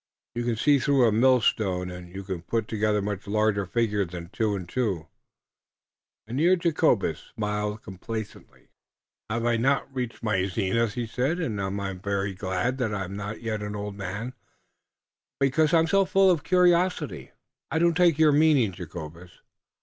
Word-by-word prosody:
You 120 - -2
can 120 -1 0
see 145 +5 +3
through 135 -1 +3
a - - +3
mill 125 +3 +4
stone, 90 -5 0
and 90 -1 -9
you 95 +2 -7
can 95 -3 -5
put 110 +5 -2
together 105 -2 0
much 100 -1 -4
larger 105 -2 +1
figures 105 -2 0
than 85 0 -8
two 110 0 -1
and 90 -3 -6
two." 100 -8 -1 1.2
Mynheer 150 +11 +3
Jacobus 170 -3 +1
smiled 105 0 -2
complacently. 110 +3 -8 0.6
"I 110 - -1
haf 115 0 +1
not 135 +3 +3
yet 135 - -26
reached 125 -3 -4
my 95 -4 +1
zenith," 100 +2 0
he 120 - -2
said, 130 +9 -1
"und 115 - -2
I 100 0 -2
am 90 - -9
very 100 0 -2
glad 95 +7 -2
I 105 -5 -1
am 95 +1 -7
not 105 +3 -6
yet 110 -2 -2
an 105 0 -4
old 105 0 -5
man, 100 +6 -5 1.1
because 145 +3 +2
I 170 - +5
am 165 - +4
so 195 +4 +3
full 190 0 +4
of 165 -4 0
curiosity." 180 0 +2 0.4
"I - - -1
don't 170 +1 +3
take 170 -3 +4
your 155 -1 +5
meaning, 145 -7 +4
Jacobus." 85 -1 -9
110 Hz, 175 wpm, -26 LUFS, 100-135 Hz, 1.2 s, I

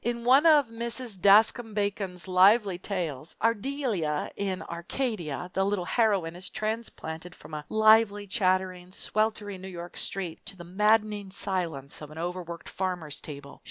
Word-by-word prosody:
In 235 0 -2
one 270 +6 +6
of 295 -6 +6
Mrs. 230 -2 -4
Daskam 215 +3 +5
Bacon's 200 -3 -2
lively 190 +1 +5
tales, 170 -7 -4
"Ardelia 225 - 0
in 195 -2 -2
Arcadia," 175 - -3
the 190 - +1
little 195 -2 0
heroine 195 -7 +1
is 180 +1 -6
transplanted 180 -6 -4
from - - -14
a 150 -1 -4
lively, 215 -1 +5
chattering, 185 -3 0
sweltering 210 -1 -1
New 190 - -7
York 175 -2 -8
street 180 -4 -3
to 195 - -6
the 175 - -9
maddening 210 +2 +1
silence 170 -9 -3
of 150 - -8
an 155 - -12
overworked 170 0 -5
farmer's 180 -5 -3
table. 140 -2 -9
190 Hz, 145 wpm, -28 LUFS, 175-215 Hz, -, one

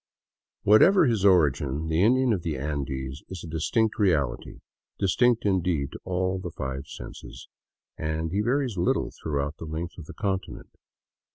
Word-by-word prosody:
Whatever 170 - +6
his 115 -7 +1
origin, 75 -5 +3
the 80 +2 +1
Indian 125 +3 +4
of 95 - -1
the 80 -4 -3
Andes 70 -1 -4
is 95 -3 -7
a - - -7
distinct 105 +9 0
reality, 75 - 0 0.4
distinct, 115 +4 +2
indeed, 90 -8 +1
to - - -9
all 95 +1 -1
the 90 - -5
five 70 -2 -5
senses, - - -10 0.5
and 80 +1 -2
he 100 +3 +1
varies 125 -1 0
little 85 - +1
throughout 75 0 -3
the - - -7
length 80 +3 -5
of 80 - -9
the - - -10
continent. 95 -2 -3
85 Hz, 155 wpm, -26 LUFS, 75-100 Hz, 0.5 s, Whatever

